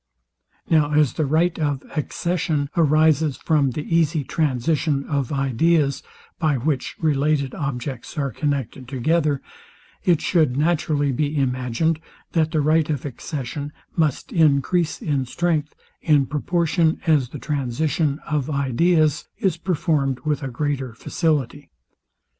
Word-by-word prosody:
Now 150 -2 +3
as 150 -3 +3
the 155 - -1
right 165 +4 +1
of 145 -3 -1
accession 155 -2 -1
arises 155 -2 +3
from 150 -4 +2
the 145 +4 -4
easy 160 -2 +1
transition 145 +1 0
of 140 -3 -2
ideas, 140 +2 +1 0.4
by 155 -4 +2
which 135 +1 -2
related 145 -2 +1
objects 135 -1 -5
are 140 -2 -1
connected 135 -2 -3
together, 145 +2 0 0.6
it 170 -4 +3
shoued 155 -8 +2
naturally 150 -2 +1
be 145 +3 -1
imagined, 130 +4 0 0.3
that 160 -2 +2
the 155 -2 +1
right 155 +1 +2
of 145 -3 -2
accession 145 +1 -5 0.2
must 160 - 0
encrease 160 0 +2
in 140 -4 0
strength, 155 0 -1 0.3
in 150 -4 +3
proportion 160 +2 +1
as 150 -7 +3
the 145 - -7
transition 145 +2 -1
of 150 -2 -1
ideas 150 +3 +2
is 190 -4 +1
performed 155 -6 0
with 155 0 -1
greater 135 -2 -2
facility. 145 -1 -1
150 Hz, 125 wpm, -22 LUFS, 140-160 Hz, 0.6 s, Now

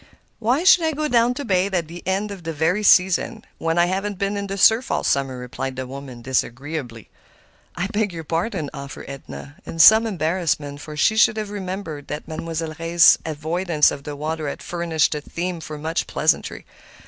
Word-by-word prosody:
"Why 245 +8 +1
should 365 -2 +6
I 320 -1 +1
go 305 +1 -1
down 240 -2 +3
to 285 - -5
bathe 190 -1 +1
at 170 -3 -1
the 170 +2 -9
very 190 - -1
end 205 +2 -3
of 195 -2 -8
the 165 +5 0
season 190 +4 +3
when 165 +1 -1
I 175 - +5
haven't 195 +2 -2
been 200 +1 -1
in 200 0 -3
the 195 0 -4
surf 225 +6 +4
all - - 0
summer," 135 -2 0
replied 125 +1 -5
the 130 0 -4
woman, 130 -2 -9
disagreeably. 130 -1 -3 0.6
"I 180 - -2
beg 205 -1 -1
your 165 -1 -7
pardon," 165 0 -2
offered 140 0 -8
Edna, 140 +1 -9
in - - -8
some 220 +7 +8
embarrassment, 160 -6 -1
for 150 0 -8
she 220 +8 +3
should 220 0 +4
have 210 -1 -4
remembered 185 -7 -5
that 150 +1 -6
Mademoiselle 160 0 -4
Reisz's 170 +1 +5
avoidance 160 +1 +1
of 140 - -6
the 145 0 -6
water 155 +1 -3
had - - -7
furnished 170 -3 0
a 150 - -4
theme 175 +3 -4
for 155 -1 -7
much 160 +2 -2
pleasantry. - - 0
165 Hz, 195 wpm, -22 LUFS, 150-200 Hz, 0.6 s, some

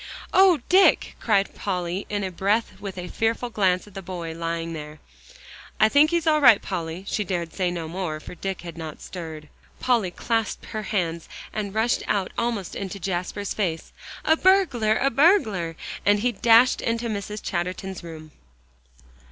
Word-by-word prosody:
"Oh, 370 -6 +6
Dick!" 380 +2 +4
cried 200 -3 +1
Polly 180 -1 -3
in 205 -1 -2
a 190 - -3
breath, 200 +2 0
with 195 -2 -7
a 180 0 -5
fearful 230 +4 -1
glance 185 -4 +1
at 205 - -16
the 195 - -6
boy 175 -3 -6
lying 165 0 -3
there. 150 -1 -7 0.8
"I 215 - +6
think 290 +5 +5
he's 340 -1 0
all 305 -1 +3
right, 245 -7 +8
Polly." 165 +3 -5
She 210 - -1
dared 175 -3 -3
say 185 -2 0
no 170 -2 -4
more, 165 -2 -4
for - - -10
Dick 190 +1 -4
had 170 -1 -9
not 160 -2 -7
stirred. 160 -4 -8 0.3
Polly 235 -7 +2
clasped 225 +4 -2
her 215 -1 -5
hands, 170 -5 -2 0.2
and 210 -1 -4
rushed 225 +2 +1
out 195 -3 0
almost 230 -6 -2
into 195 0 -5
Jasper's 185 +2 -3
face. 175 -6 -3 0.3
"A 320 - +5
burglar 320 - +3
a 275 - +1
burglar!" 225 - +3 0.3
and 205 0 +3
he 245 +2 +2
dashed 235 +3 +5
into 230 +1 -1
Mrs. 210 -1 -4
Chatterton's 185 +1 -3
room. 155 -2 -10
195 Hz, 170 wpm, -24 LUFS, 175-230 Hz, 0.8 s, right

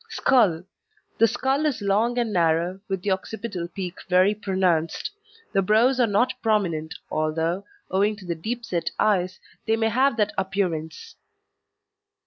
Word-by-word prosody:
SKULL 205 - +3 0.6
The 230 - +6
skull 270 +6 0
is 285 - -1
long 215 +4 +1
and 235 -3 0
narrow, 170 +1 +1
with 190 -2 -3
the 205 - 0
occipital 190 -2 -3
peak 180 0 -6
very 185 +3 +4
pronounced. 185 - 0 0.4
The 195 - +3
brows 225 +7 +3
are 245 - +4
not 210 +5 +2
prominent, 175 -8 0 0.2
although, 160 +5 -1 0.3
owing 200 +3 +2
to 200 -2 -13
the 175 - -1
deep 230 +9 -4
set 170 -5 -1
eyes, 185 -3 +1 0.3
they 220 - +3
may 225 0 +1
have 260 +2 +2
that 210 -2 +1
appearance. 190 - -3
195 Hz, 145 wpm, -24 LUFS, 175-225 Hz, 0.6 s, The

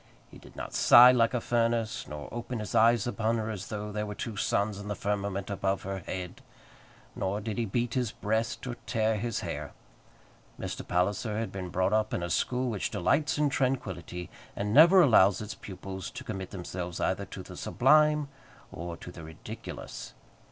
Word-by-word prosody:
He - - -13
did - - -16
not - - -6
sigh 125 +1 +9
like 120 -1 +3
a - - +2
furnace, 115 -1 0
nor 75 -1 -7
open 120 +1 -4
his 105 -3 -5
eyes 115 0 +5
upon 115 -1 0
her 110 0 -2
as 100 -3 -6
though 105 0 -5
there 105 0 -3
were 105 - -5
two 110 +1 -5
suns 100 0 0
in 100 - -8
the 105 - -2
firmament 100 -1 -2
above 100 0 -1
her 95 0 -4
head, 90 0 -6 0.7
nor 95 +2 -1
did 110 +1 -4
he 115 - +1
beat 120 +3 -1
his 125 -4 0
breast 110 +4 -2
or 120 -2 -5
tear 110 0 +1
his 115 +1 -2
hair. - - -5 0.9
Mr. - - -4
Palliser 100 +4 0
had 115 0 -2
been 95 -2 -5
brought 95 +3 +1
up 110 0 +1
in 85 - -2
a 85 - -3
school 125 +7 0
which 105 - -2
delights 145 - +1
in 150 -1 +3
tranquillity, 95 - -2 0.2
and 105 +1 -2
never 170 +7 +8
allows 100 - +5
its 105 -1 -5
pupils 95 -1 -7
to 130 - -8
commit 95 -6 -5
themselves 90 -2 -5
either - - 0
to - - -8
the - - -10
sublime 150 +2 +3 0.4
or 85 0 -6
to 90 - -9
the 85 - -10
ridiculous. 80 0 -8
105 Hz, 185 wpm, -29 LUFS, 95-120 Hz, 0.9 s, sigh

